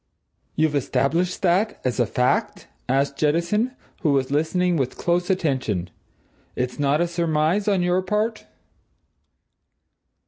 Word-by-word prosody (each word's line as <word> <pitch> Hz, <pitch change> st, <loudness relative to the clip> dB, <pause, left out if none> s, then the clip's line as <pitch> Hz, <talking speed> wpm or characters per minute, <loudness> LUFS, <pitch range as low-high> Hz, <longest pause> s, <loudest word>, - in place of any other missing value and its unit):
"You've 155 Hz, -1 st, +2 dB
established 165 Hz, +7 st, 0 dB
that 190 Hz, +4 st, +2 dB
as 125 Hz, 0 st, -1 dB
a 120 Hz, -, +3 dB
fact?" 125 Hz, 0 st, 0 dB, 0.2 s
asked 140 Hz, +1 st, +1 dB
Jettison, 170 Hz, -, +1 dB, 0.3 s
who 150 Hz, -5 st, +2 dB
was 135 Hz, -1 st, 0 dB
listening 175 Hz, +4 st, +1 dB
with 130 Hz, -4 st, -2 dB
close 175 Hz, +1 st, 0 dB
attention. 130 Hz, -, -1 dB, 0.6 s
"It's 125 Hz, +2 st, -3 dB
not 145 Hz, +2 st, +2 dB
a 175 Hz, -, +2 dB
surmise 170 Hz, +3 st, 0 dB
on 195 Hz, -3 st, +2 dB
your 180 Hz, +1 st, +2 dB
part?" 210 Hz, +4 st, -2 dB
165 Hz, 125 wpm, -23 LUFS, 140-180 Hz, 0.6 s, a